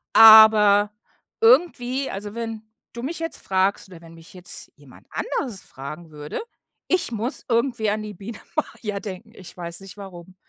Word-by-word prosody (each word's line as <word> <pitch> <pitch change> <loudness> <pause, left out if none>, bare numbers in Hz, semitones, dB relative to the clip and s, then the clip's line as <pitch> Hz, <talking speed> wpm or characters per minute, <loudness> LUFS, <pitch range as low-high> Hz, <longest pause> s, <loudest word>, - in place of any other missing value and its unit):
Aber, 215 -2 +8 0.5
irgendwie, 260 0 +3
also 205 +2 -7
wenn 225 -2 -5 0.3
du 235 - -7
mich 300 +7 -4
jetzt 330 -1 -4
fragst 190 +1 0
oder 180 -3 -12
wenn 165 -1 -14
mich 165 +1 -16
jetzt 180 0 -8
jemand - - -18
anderes 245 - -4
fragen 150 +5 -9
würde, 150 0 -6 0.5
ich 365 -8 0
muss 235 +5 -4
irgendwie 235 -2 +1
an 215 +1 -2
die 210 0 -7
Biene 205 +4 -9 0.2
Maja 210 -3 -3
denken. 205 +1 -8
Ich 185 -5 -13
weiß 170 -1 -5
nicht 195 0 -12
warum. 185 -2 -11
210 Hz, 160 wpm, -23 LUFS, 185-235 Hz, 0.5 s, Aber